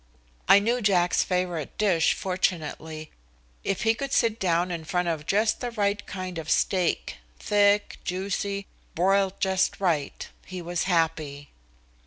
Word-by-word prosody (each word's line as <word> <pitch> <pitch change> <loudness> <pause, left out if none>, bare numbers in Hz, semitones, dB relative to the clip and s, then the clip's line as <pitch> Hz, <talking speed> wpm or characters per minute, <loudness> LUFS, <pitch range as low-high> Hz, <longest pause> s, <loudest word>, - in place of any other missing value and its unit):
I - - +8
knew 235 +5 +1
Jack's 180 -4 +3
favorite 180 -5 -2
dish, 180 -6 +3
fortunately. 160 -4 -3 0.5
If 195 - -1
he 225 0 +4
could 275 +4 -5
sit 230 -3 +2
down 175 -1 +1
in 170 -2 -4
front 180 +2 -1
of 155 -3 -2
just 215 +2 +2
the 245 - -3
right 205 -3 -1
kind 185 -3 -5
of 160 -1 -7
steak, 185 -3 +1 0.2
thick, 205 - +2
juicy, 200 +2 -2 0.3
broiled 195 +2 +2
just 190 -1 +1
right, 165 -7 -1 0.2
he 185 -1 -7
was 175 0 -2
happy. 160 -5 -1
185 Hz, 140 wpm, -26 LUFS, 165-200 Hz, 0.5 s, I